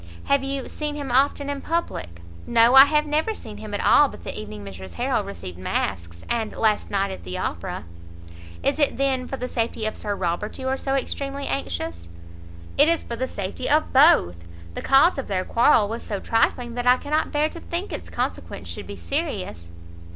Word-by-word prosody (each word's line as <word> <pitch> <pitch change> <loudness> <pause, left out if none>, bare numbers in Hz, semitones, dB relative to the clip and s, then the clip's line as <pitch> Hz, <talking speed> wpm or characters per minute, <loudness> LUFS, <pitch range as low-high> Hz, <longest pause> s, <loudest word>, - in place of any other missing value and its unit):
"Have 280 -1 +2
you 270 -1 -3
seen 300 -1 -4
him 285 -3 -4
often 280 +2 +2
in 285 -1 -3
public?" 85 - -3 0.3
"No, 235 +1 +5
I 270 +1 +11
have 300 +1 +2
never 310 +9 0
seen 215 - -9
him 215 0 -8
at - - -2
all 290 -1 +6
but - - -12
the - - -5
evening 105 -1 -7
Mrs 95 -2 -9
Harrel - - 0
received 90 -1 -8
masks, 85 -2 -3
and 225 -2 -2
last 215 -2 +1
night 200 -1 0
at 90 - -8
the 90 +1 -5
Opera." - - -4 0.8
"Is 280 +3 +1
it, 290 - +2
then, 265 -2 0
for 270 - -4
the 250 - -4
safety 230 -2 -2
of 215 - -2
Sir 205 -1 -2
Robert 180 +3 -2
you 260 - -4
are 265 - +1
so 270 0 -1
extremely 275 +1 -3
anxious?" 85 -1 -3 0.7
"It 295 +3 +7
is 335 - +2
for 235 - -5
the 260 +3 -2
safety 200 +4 -4
of 305 +2 +2
both; 90 - +5 0.3
the - - -5
cause 275 +4 +5
of 270 - -5
their 185 -2 -1
quarrel 230 -3 +4
was 225 +3 -5
so 200 -2 -4
trifling, 235 +2 +1
that 245 +1 -3
I 250 +1 +7
cannot 300 +4 -1
bear 295 0 +2
to 335 - -9
think 345 +4 -4
its - - -6
consequence - - -4
should - - -6
be - - -7
serious." 210 - -4
245 Hz, 200 wpm, -24 LUFS, 185-280 Hz, 0.8 s, I